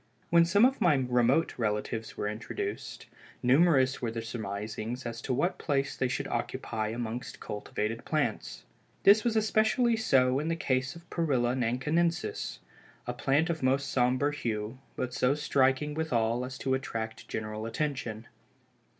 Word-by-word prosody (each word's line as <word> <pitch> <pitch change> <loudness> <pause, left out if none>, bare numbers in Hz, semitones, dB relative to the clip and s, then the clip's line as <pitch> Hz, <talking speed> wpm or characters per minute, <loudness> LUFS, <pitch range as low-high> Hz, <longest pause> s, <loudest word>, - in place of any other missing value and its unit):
When 170 0 +6
some 200 +7 +5
of 265 +1 +1
my 160 -4 +5
remote 125 +3 +2
relatives 110 +1 -2
were 105 - -1
introduced, 260 - -5 0.4
numerous 135 0 +4
were 120 - -1
the 115 0 -4
surmisings 110 +2 -5
as 115 0 -5
to 130 - -4
what 145 +9 0
place 140 -2 0
they 130 - 0
should - - -2
occupy 110 -1 -2
amongst 115 +2 -5
cultivated 105 +2 -4
plants. 150 -9 -2 0.4
This 205 +2 +7
was 235 -2 +1
especially 220 +2 +3
so 130 - +3
in 150 - -2
the 165 - +1
case 130 -3 -1
of 170 0 -13
Perilla 130 -8 +1
Nankinensis, 150 +8 0 0.5
a - - -3
plant 150 +5 +1
of 160 - -4
most 135 +1 +1
sombre 130 +3 +2
hue, 115 -2 -3 0.2
but 125 -1 -3
so 125 +2 +2
striking 140 0 +2
withal 125 -6 0
as 130 0 -7
to 130 - -1
attract 115 -3 -4
general 110 0 -4
attention. 115 -4 -3
130 Hz, 150 wpm, -29 LUFS, 115-155 Hz, 0.5 s, This